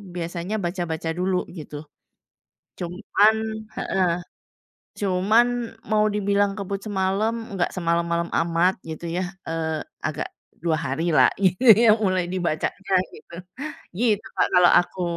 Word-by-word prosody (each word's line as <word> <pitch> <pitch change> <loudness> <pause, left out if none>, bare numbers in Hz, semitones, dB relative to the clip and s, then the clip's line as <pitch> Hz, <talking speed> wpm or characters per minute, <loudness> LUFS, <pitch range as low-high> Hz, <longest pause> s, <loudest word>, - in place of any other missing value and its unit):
biasanya 175 +4 -3
baca-baca 170 -2 -3
dulu 185 0 0
gitu. 150 -1 -8 0.9
Cuman 205 +4 +2 0.4
heeh, 185 -2 +1 0.9
cuman 205 +5 +3 0.4
mau 215 0 +4
dibilang 200 0 +1
kebut 200 0 -4
semalam, 195 +3 0 0.2
nggak 180 -2 0
semalam-malam 170 -1 0
amat 170 +2 +2
gitu 160 +1 -6
ya, 185 - 0 0.2
eee, 160 -1 -2 0.3
agak 155 - -3 0.4
2 165 -2 +2
hari 160 +6 -1
lah, - - +6
gitu 185 +5 +2 0.2
ya - - +8
mulai 185 -2 +1
dibacanya, 185 +2 -2 0.2
gitu. 170 - -14 0.6
Gitu 215 -2 +1
Kak - - +3
kalau 180 -1 +7
aku. 180 +1 -6
180 Hz, 120 wpm, -24 LUFS, 170-200 Hz, 0.9 s, ya